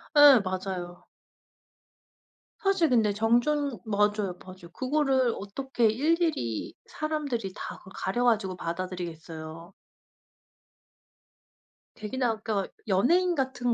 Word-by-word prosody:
예 290 -4 +9
맞아요. 185 -2 -5 1.5
사실 385 -5 +2
근데 220 -4 +3
정정 240 +4 +1
맞아요. 205 -3 0
맞아요. 185 -2 -12
그거를 265 -3 +1
어떻게 240 +4 -2
일일이 290 - 0
사람들이 285 -10 -3
다 - - -6
그걸 190 - -15
가려 240 +6 -1
가지고 215 -6 +2
받아들이겠어요. 170 -1 -6 2.2
되게 215 +4 -6
나 245 -3 +2
아까 215 -3 -2 0.2
연예인 340 - +3
같은 260 -3 0
220 Hz, 235 characters per minute, -28 LUFS, 185-270 Hz, 2.2 s, 예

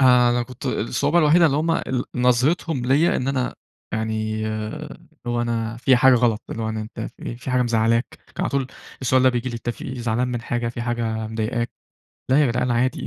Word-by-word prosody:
آآ، 125 -2 +6
أنا 120 0 +1
كنت 125 0 -8
الصعوبة 145 +8 +1
الوحيدة 165 +2 +5
اللي 145 -2 +1
هم 160 +2 +1
ال 130 -6 -1
نظرتهم 125 +3 +2
ليَّ 145 +6 +3
إن 130 - -2
أنا 130 -2 -1 0.4
يعني، 110 0 -2
اللي 110 0 -5 0.3
هو 120 0 0
أنا 115 -1 -2
فيَّ 130 +1 +4
حاجة 130 +2 +6
غلط، 115 -3 +2
اللي 115 - -4
هو - - -1
يعني 110 0 -3
أنتَ 110 +1 -8 0.2
في - - -15
إيه؟ 120 - -4
في 125 +2 -6
حاجة 125 0 +3
مزعلاك؟ 115 0 +2 0.3
كان - - -3
على - - 0
طول 135 -1 0 0.4
السؤال 130 +1 +3
ده 130 - +6
بييجي 125 0 -1
لي: 120 - -5
"أنتَ 120 +1 -3
في - - -8
إيه؟ 130 -1 -5
زعلان 120 +2 0
من 120 -1 -3
حاجة؟ 120 0 -2
في 120 0 -5
حاجة 115 -2 -2
مضايقك؟" 110 +2 -2 0.6
لا 135 +3 +5
ياجدعان 125 +1 0
عادي 120 +2 0
120 Hz, 215 wpm, -22 LUFS, 115-130 Hz, 0.6 s, آآ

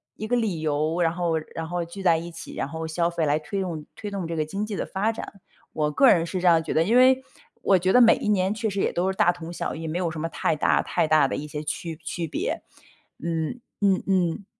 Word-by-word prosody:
一 215 - -5
个 245 - +1
理 210 -9 0
由， 155 +3 0
然 165 - +3
后 170 -2 0 0.2
然 165 0 -4
后 175 0 -2
聚 190 +4 -8
在 170 -3 +5
一 170 +1 -6
起， 165 -1 -9
然 - - -2
后 160 +1 -5
消 170 +2 0
费， 170 -2 -1
来 150 +1 +2
推 190 +6 -4
动 165 -5 -4
推 205 -1 -6
动 190 -4 -3
这 165 - -3
个 155 -1 0
经 200 +7 -3
济 215 - -5
的 - - -2
发 205 +4 0
展。 200 -3 -9 0.3
我 150 -1 0
个 265 - +5
人 170 -2 +4
是 180 +2 -3
这 180 - +2
样 165 -2 +6
觉 - - -3
得， 160 - +3
因 225 +7 +1
为 260 +1 +5 0.4
我 190 -2 +4
觉 185 +2 +1
得 250 - +7
每 230 - +7
一 - - -4
年 195 -1 +2
确 220 0 -2
实 200 0 -3
也 - - +1
都 185 +2 0
是 190 - -9
大 175 - +5
同 170 -1 -8
小 - - -3
异， 160 0 -5
没 155 - -2
有 175 -3 -1
什 155 - -6
么 165 - -1
太 160 - 0
大 - - +3
太 - - 0
大 155 -3 +4
的 - - -3
一 150 - -5
些 150 0 -5
区 160 +2 -4
区 165 0 -3
别。 - - -3 0.6
嗯， 165 +7 -2 0.2
嗯 195 -2 +2
嗯。 185 -1 +1
170 Hz, 290 characters per minute, -25 LUFS, 160-195 Hz, 0.6 s, 得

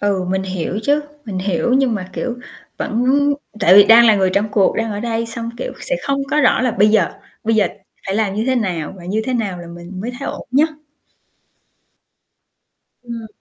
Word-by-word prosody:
Ừ, 200 -2 0
mình 190 0 0
hiểu 185 0 -3
chứ, 290 +3 +2 0.2
mình 200 -5 -4
hiểu. 190 +5 0
Nhưng 265 -3 +2
mà, 185 -3 -5
kiểu, 245 -1 -3 0.4
vẫn 230 +3 -1 0.6
tại 185 -2 +6
vì 200 0 +9
đang 230 +2 +7
là 220 - +6
người 190 -1 +2
trong 205 +2 +1
cuộc, 205 -2 +2
đang 225 -1 -1
ở 205 - -4
đây, 230 0 -2
xong, 230 0 -5
kiểu, - - -4
sẽ - - -1
không 275 -1 -1
có 300 - +3
rõ 255 - +4
là 255 -1 +1
bây 210 -1 +3
giờ 215 +1 +2 0.3
bây 225 +1 +2
giờ 210 -3 +3 0.4
phải 195 - -2
làm 210 -2 0
như 215 +2 -1
thế 260 - +2
nào 180 -9 -2
và 175 - -12
như 205 +5 -1
thế 255 - -2
nào 205 -7 -2
là 175 - -9
mình 175 +2 -9
mới 230 +5 -3
thấy 275 - -4
ổn - - -7
nhất. 285 +5 +3 2.3
Ừm. 235 -2 -7
215 Hz, 210 wpm, -18 LUFS, 190-235 Hz, 2.3 s, vì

